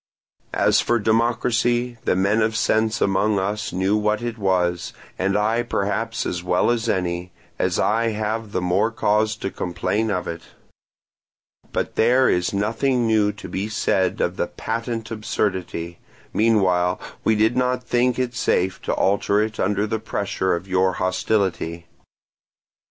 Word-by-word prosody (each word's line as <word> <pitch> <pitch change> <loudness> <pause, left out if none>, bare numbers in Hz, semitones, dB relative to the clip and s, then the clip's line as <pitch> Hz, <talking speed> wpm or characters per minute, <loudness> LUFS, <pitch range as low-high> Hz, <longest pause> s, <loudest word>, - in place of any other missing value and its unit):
As - - +4
for 120 - +1
democracy, 120 +2 +1
the - - +2
men 100 +4 +2
of 110 0 +1
sense 110 0 +1
among 100 +2 +2
us 105 +2 -2
knew 95 +3 +1
what 105 +1 0
it 120 -1 -4
was, 90 -3 0 0.3
and 95 +2 +1
I 110 +3 +1
perhaps 115 0 -2
as 90 - -2
well 90 +5 +2
as 115 -1 -1
any, 90 -2 -1 0.3
as - - +1
I 115 +2 +2
have 110 0 -2
the 90 - -1
more 90 +5 +2
cause 110 -1 +1
to 95 -3 -4
complain 100 +5 -1
of 90 -3 -2
it; 85 0 -5 1.3
but - - -3
there 125 +3 +4
is 90 0 +1
nothing 115 +5 0
new 110 -2 +3
to 100 - -9
be 100 +3 -3
said 95 -3 0
of - - -1
a - - +1
patent 115 0 -4
absurdity; 95 -6 -3 0.3
meanwhile 95 -5 +2 0.2
we 110 - +3
did 110 +3 +2
not 125 0 0
think 125 0 +1
it 125 -1 -1
safe 95 -4 0
to - - -2
alter 100 +1 +2
it 110 0 -2
under 100 +2 +1
the 110 +1 -2
pressure 95 -3 -1
of 85 +3 -6
your 95 0 +2
hostility. 95 -2 -1
105 Hz, 150 wpm, -22 LUFS, 95-115 Hz, 1.3 s, As